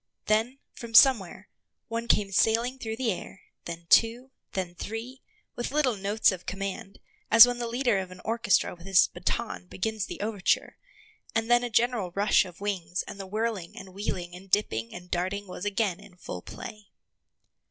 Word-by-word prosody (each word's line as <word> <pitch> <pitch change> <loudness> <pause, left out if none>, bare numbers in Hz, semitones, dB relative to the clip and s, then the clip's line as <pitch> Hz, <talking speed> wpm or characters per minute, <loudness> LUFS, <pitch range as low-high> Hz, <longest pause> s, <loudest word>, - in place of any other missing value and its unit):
Then, 225 +5 +1 0.2
from 235 -3 -8
somewhere, 210 -7 +5 0.4
one 230 0 -4
came 205 -3 +2
sailing 230 +6 +2
through 220 -2 -4
the 240 -2 0
air, 185 +1 -7 0.2
then 170 0 -7
two, 235 +7 +3 0.2
then 185 -2 -3
three, 225 +8 -7 0.3
with 240 - -3
little 275 -4 +1
notes 205 +2 +2
of 185 -2 -8
command, 195 0 -5 0.3
as 230 +1 +11
when 245 0 -2
the 240 - -2
leader 240 -3 +1
of 190 -1 -5
an 185 0 -12
orchestra 225 -3 +1
with 175 +1 -13
his 190 -2 +6
baton 180 +2 -3
begins 215 +2 -3
the - - -7
overture, 205 -2 0 0.6
and 225 +1 0
then 240 0 +5
a 245 - -2
general 230 -4 +1
rush 200 0 +4
of 180 -2 -12
wings 180 -4 -2
and 200 - -10
the 195 - -6
whirling 215 -3 -3
and 190 -1 -10
wheeling 180 -3 -4
and 190 +2 -13
dipping 115 - 0
and 180 0 -10
darting 190 +3 -2
was 180 0 -7
again 200 -3 0
in 200 -2 -16
full 90 - -7
play. 210 - -10
205 Hz, 175 wpm, -27 LUFS, 185-230 Hz, 0.6 s, as